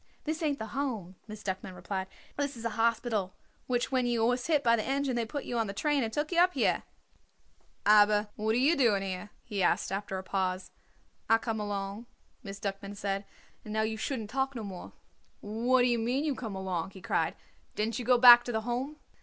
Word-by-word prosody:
"This 315 +2 -3
ain't 295 -3 0
the 220 - -5
Home," 225 -10 -3
Miss 215 -1 -9
Duckman 190 -1 -4
explained. 190 +1 -4 0.3
"This 285 -3 -2
is 230 - -8
a 230 - 0
hospital, 225 -3 0 0.3
which 245 0 0
when 255 -2 +2
you 235 -2 +2
was 245 +1 0
hit 300 -4 +2
by 230 -1 +5
the 215 - -1
engine 270 -1 0
they 235 -2 -1
put 285 +4 -4
you 240 - -2
on 225 - 0
the 195 - -6
train 295 +3 +1
and 225 -2 -1
took 295 +7 -2
you 340 - +2
up 360 +1 +4
here." - - +2 1.0
"Aber 210 0 +6
what 220 +1 0
are - - +3
you 285 +7 +4
doing 220 -8 +3
here?" 190 +1 -5
he 205 -4 -3
asked 180 - +2
after 195 -1 -3
a 190 - -5
pause. 185 -1 -2 0.6
"I 225 - +7
come 225 -1 -3
along," 205 +2 -4 0.3
Miss 200 -4 -8
Duckman 200 0 -5
said; 195 0 -2 0.4
"and 215 - -8
now 220 0 +1
you 220 0 -1
shouldn't 220 -1 -4
talk 270 +1 -1
no 230 - -4
more." 190 -3 -8 0.5
"What 240 +4 +2
d'ye 245 -1 +3
mean, 245 +5 0
you 305 -2 0
come 225 -6 -6
along?" 185 -3 -3
he - - -11
cried. - - 0 0.4
"Didn't 220 +2 -1
you - - -3
go 250 0 +5
back 240 0 +10
to 245 - -3
the 220 -1 -1
Home?" 245 +6 -3
225 Hz, 215 wpm, -30 LUFS, 200-250 Hz, 1.0 s, back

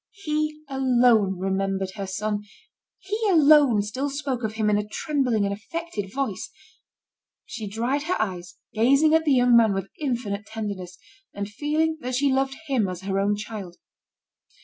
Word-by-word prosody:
He 305 -1 -2
alone 245 -7 +3
remembered 195 0 -1
her 195 -1 -5
son, 205 +2 -2 0.5
he 415 +3 -4
alone 295 - +6
still 260 +7 -3
spoke 275 -3 -3
of 220 0 -2
him 220 -1 -1
in 210 0 +3
a 210 - -4
trembling 250 -4 0
and 200 - -1
affected 215 - -5
voice. 270 - -3 1.0
She 220 -2 -6
dried 235 +7 -1
her 360 - 0
eyes, 180 -4 -3 0.2
gazing 275 +8 +4
at 320 0 +3
the 290 - +4
young 245 -1 +5
man 225 -4 +5
with 195 0 -4
infinite 235 -8 -3
tenderness, 200 -5 -6 0.4
and 205 0 -3
feeling 305 +8 -1
that 250 0 -3
she 275 +1 +2
loved 270 0 0
him 260 -9 +1
as 180 -1 -5
her 195 0 -1
own 205 +1 +2
child. 205 -4 -7
225 Hz, 160 wpm, -25 LUFS, 200-275 Hz, 1.0 s, alone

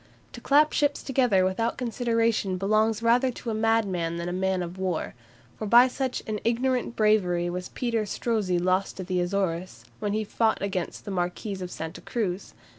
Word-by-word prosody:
To - - -9
clap 300 +2 +4
ships 290 -1 +1
together 245 -8 +2
without 205 +5 -1
consideration 230 -5 0
belongs 215 +3 +1
rather 245 +3 +4
to 235 - -5
a - - -2
madman 205 -7 +1
than 170 - -4
to 175 - -3
a - - -3
man 190 -1 0
of 175 +2 -7
war; 185 -4 -2 0.5
for 215 - -3
by 240 +4 +7
such 260 0 -3
an 215 -2 -3
ignorant 245 +1 0
bravery 180 -5 +2
was 180 +1 -5
Peter 230 -4 -1
Strozzi 205 -4 0
lost 185 +3 0
at 185 - -4
the 180 -1 0
Azores, 180 -1 -2
when 205 -2 -2
he 215 +1 0
fought 220 +1 +1
against 190 -3 -3
the 205 - -5
Marquis 185 +2 -3
of 180 - -4
Santa 160 0 -7
Cruz. 200 -5 -3
205 Hz, 185 wpm, -26 LUFS, 185-230 Hz, 0.5 s, by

